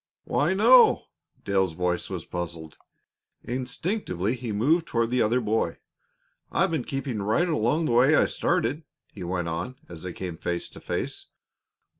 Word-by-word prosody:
"Why, 160 +6 +1
no!" 235 +5 +6 0.4
Dale's 95 -3 +1
voice 90 +1 -1
was - - -5
puzzled; 85 -2 -5 0.7
instinctively 125 - -2
he 120 -2 -5
moved 150 +11 +2
toward 115 0 0
the 125 -1 +2
other 115 +4 +3
boy. 110 -7 0 0.7
"I've - - +2
been 155 -7 -1
keeping 135 -6 -3
right 110 - +2
along 155 +1 +1
the - - 0
way 130 +6 +5
I - - +5
started," 170 -3 0 0.3
he - - -7
went 90 -1 -2
on, 85 +9 -3
as 85 -2 -10
they 90 - -5
came 90 -2 -6
face 85 +1 -3
to - - -12
face. - - -4
115 Hz, 155 wpm, -26 LUFS, 90-145 Hz, 0.7 s, no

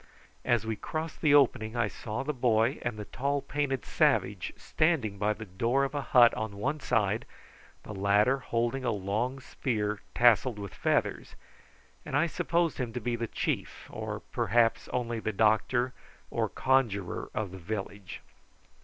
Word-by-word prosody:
As - - +1
we 110 0 -1
crossed 155 +8 -5
the 150 -3 +5
opening 125 -5 +3
I 120 -3 +2
saw 110 +3 -5
the 150 +2 -2
boy 120 0 +2
and 120 -3 -3
the 105 - -6
tall 140 +6 -1
painted 140 -1 -2
savage - - +1
standing 135 - 0
by 105 +1 +2
the 110 +1 -9
door 115 +8 +1
of 135 - -2
a 145 - -1
hut 120 -2 +6
on 110 -2 -4
one 140 +9 -1
side, 105 -5 +1 0.6
the 105 - -8
latter 105 +7 +3
holding 120 +1 -1
a 125 - +1
long 110 +6 -1
spear 105 -6 -2
tasselled 120 0 +4
with 100 -2 -7
feathers, - - -1 0.7
and - - -1
I - - +4
supposed 170 0 0
him 125 -3 -2
to 125 - -2
be 120 +1 -1
the 115 0 -3
chief, - - -3
or - - -5
perhaps 115 -1 +2
only 120 -2 -2
the 110 - -2
doctor 110 +4 +2 0.4
or - - 0
conjuror 110 -9 0
of 105 -3 -2
the 95 - -9
village. 100 +1 -6
115 Hz, 160 wpm, -29 LUFS, 105-135 Hz, 0.7 s, hut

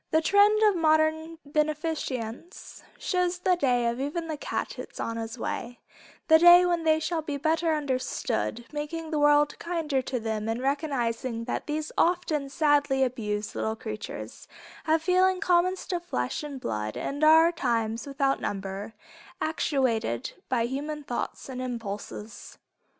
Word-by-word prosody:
The 315 - +3
trend 410 +5 +4
of 420 -2 +5
modern 315 0 +2
beneficence 300 - -3 0.2
shows 360 -1 0
the 360 0 +2
day 250 -7 +1
of 235 +1 -1
even 325 +4 -3
the 315 - -3
cat 290 - -4
is - - -9
on 230 - -2
the 225 +1 -5
way, 240 +1 -4 0.5
the 320 0 +7
day 350 +1 +8
when 345 -2 0
they 315 0 +4
shall 325 0 -1
be 295 -2 -4
better 320 +2 +1
understood, 255 -4 -2
making 315 +2 -5
the 305 - 0
world 295 0 +4
kinder 320 -6 -1
to 255 0 -3
them 220 -1 -3
in 225 +1 -1
recognizing 255 -4 -1
that 245 - -4
these 305 +1 -3
often 325 -5 +1
sadly 285 -2 +2
abused 210 -4 -2
little 220 0 -2
creatures, 215 -1 -7 0.4
have 320 0 +3
the - - -17
feelings 370 +1 +3
common 365 0 +3
to 360 -1 -3
flesh 125 - -3
and 290 -3 -6
blood 105 - -3
and 285 +2 -3
are 320 +2 +7
times 230 -6 -1
without 275 0 0
number, 195 +2 -4 0.4
actuated 255 - 0 0.2
by 245 -3 +1
human 290 +4 -4
thoughts 245 -3 -4
and 255 -1 -5
impulses. 220 -3 -6
290 Hz, 150 wpm, -27 LUFS, 235-320 Hz, 0.5 s, day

